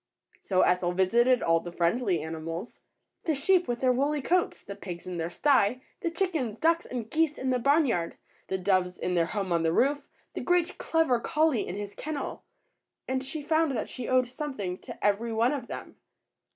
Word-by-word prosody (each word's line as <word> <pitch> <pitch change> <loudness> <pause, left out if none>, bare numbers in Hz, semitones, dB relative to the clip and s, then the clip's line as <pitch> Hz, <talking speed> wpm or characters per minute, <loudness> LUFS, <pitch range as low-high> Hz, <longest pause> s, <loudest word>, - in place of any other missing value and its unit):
So 185 -2 +2
Ethel 180 -1 +2
visited 235 +7 +3
all 165 0 +3
the 175 +1 -8
friendly 175 0 +1
animals, 165 +5 -6 0.2
— - - -44
the 315 - +1
sheep 360 +6 +3
with 240 0 -2
their 255 -1 +4
woolly 285 +4 +1
coats, 360 +3 +1
the 200 - -7
pigs 180 -4 -8
in 180 -1 -5
their 165 0 -2
sty, 255 +2 +2 0.2
the 350 - -1
chickens, 330 - -1
ducks, 330 +3 +2
and 240 -4 -4
geese 310 +3 +1
in 260 0 -1
the 250 - +1
barn 285 +5 +4
yard, 175 -10 -1 0.3
the 190 - -1
doves 185 -1 +1
in 180 - -2
their 170 -2 +2
home 195 -1 -3
on 170 -1 +2
the 165 0 +2
roof, 280 - +3 0.3
the - - -4
great 355 0 +1
clever 320 -7 +2
collie 305 -1 +1
in 180 - -4
his 205 0 -5
kennel; 300 -2 -5 0.6
and 260 0 -1
she 295 +3 -5
found 315 -3 +2
that - - -3
she 250 -3 -6
owed 255 0 +4
something 245 -8 -5
to - - -7
every 210 +3 +1
one 230 +4 +2
of 260 -5 -4
them. - - -8
240 Hz, 200 wpm, -28 LUFS, 185-295 Hz, 0.6 s, their